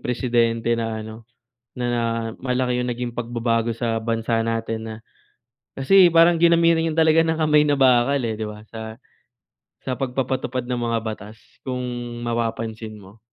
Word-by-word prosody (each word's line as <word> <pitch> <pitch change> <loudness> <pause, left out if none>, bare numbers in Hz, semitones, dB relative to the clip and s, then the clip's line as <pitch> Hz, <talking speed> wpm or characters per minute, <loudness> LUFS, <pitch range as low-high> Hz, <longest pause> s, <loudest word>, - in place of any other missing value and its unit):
presidente 120 -2 0
na 115 -1 -3
ano, 110 +1 -11 0.5
na 125 - -2
na 120 -1 0 0.4
malaki 125 -1 0
yung 125 - -2
naging 120 0 -4
pagbabago 115 -1 -1
sa 115 -1 -2
bansa 115 0 -1
natin 115 0 -2
na 110 - -6 0.8
kasi 185 +8 +5
parang 165 +1 +5
ginamitan 170 -1 +4
niya 160 - -1
talaga 160 0 +5
ng 160 -1 0
kamay 150 -1 +4
na 145 - +3
bakal, 130 +1 +4
eh, 115 -2 -2
'di 110 - -3
ba, 105 0 -9
sa 110 -1 -7 0.9
sa 130 - -2
pagpapatupad 130 -1 -2
ng 125 -1 -2
mga 115 -1 0
batas 110 0 -7 0.2
kung 125 -1 -3 0.4
mapapansin 115 -2 -3
mo. 100 +3 -16
120 Hz, 155 wpm, -22 LUFS, 115-130 Hz, 0.9 s, kasi